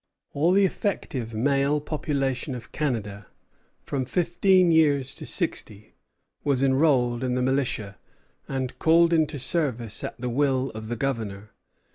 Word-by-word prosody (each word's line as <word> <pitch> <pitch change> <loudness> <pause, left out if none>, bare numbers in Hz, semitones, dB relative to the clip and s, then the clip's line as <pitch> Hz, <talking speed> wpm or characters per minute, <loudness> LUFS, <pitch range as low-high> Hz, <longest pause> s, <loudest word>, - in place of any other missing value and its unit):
All 160 +5 +2
the 195 +1 +5
effective 130 - -3
male 140 +4 +2
population 140 -3 -2
of 120 - -10
Canada, 105 - -3 0.6
from 135 -2 -2
fifteen 175 +4 +3
years 145 -4 +3
to - - -7
sixty, 105 0 -2 0.5
was 140 -2 +1
enrolled 130 -3 +2
in 125 -1 0
the 125 - 0
militia, 130 -7 -1 0.5
and 130 -2 -4
called 170 +1 +4
into 155 -2 +1
service 130 -6 -1
at 110 - -6
the 125 - -3
will 135 +1 +1
of 110 0 -8
the 120 - -3
Governor. 110 -5 -3
135 Hz, 135 wpm, -25 LUFS, 120-150 Hz, 0.6 s, the